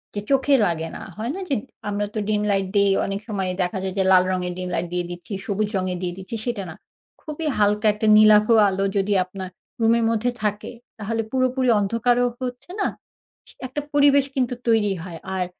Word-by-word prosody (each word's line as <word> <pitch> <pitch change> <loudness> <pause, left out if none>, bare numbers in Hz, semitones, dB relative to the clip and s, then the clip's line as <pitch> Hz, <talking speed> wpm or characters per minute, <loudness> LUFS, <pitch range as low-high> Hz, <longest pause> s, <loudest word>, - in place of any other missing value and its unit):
যে 205 - -2
চোখে 275 +1 +4
লাগে 165 -3 -2
না। - - -8 0.2
হয় 230 +5 -3
না? 390 - -5
যে 275 - +2 0.3
আমরা 205 0 -1
তো 215 - 0
ডিম 210 -1 +1
লাইট 195 -1 +1
দেই। 200 -1 +4
অনেক 195 0 -3
সময় 195 -4 -2
দেখা 180 +2 -3
যায় 190 0 -3
যে - - +4
লাল 185 -1 +7
রঙের 180 -1 -2
ডিম 180 0 -4
লাইট 175 +1 -2
দিয়ে 175 -1 -1
দিচ্ছি, 175 +5 -8
সবুজ 205 +1 -1
রঙের 185 -1 -2
দিয়ে 175 - -2
দিচ্ছি, 190 +5 -7
সেটা 235 -5 -2
না। 160 - -9 0.5
খুবই 310 +1 -5
হালকা 210 +1 +2
একটা 215 +1 -2
নীলাভ 215 0 +7 0.2
আলো 195 +1 -1
যদি 200 +1 +1
আপনার 185 0 -7 0.3
রুমের 230 +1 +3
মধ্যে 230 +2 0
থাকে, 210 0 -2 0.3
তাহলে 225 +2 -2
পুরোপুরি 255 -1 +1
অন্ধকারও 240 +4 +2
হচ্ছে 250 +7 -6
না। - - +2 0.6
ইস - - -15 0.2
একটা 290 +4 -4
পরিবেশ 285 -1 +5
কিন্তু 250 -2 0
তৈরি 215 -3 +3
হয়। 170 -3 -8 0.2
আর 180 -1 0
210 Hz, 195 wpm, -23 LUFS, 190-245 Hz, 0.6 s, লাল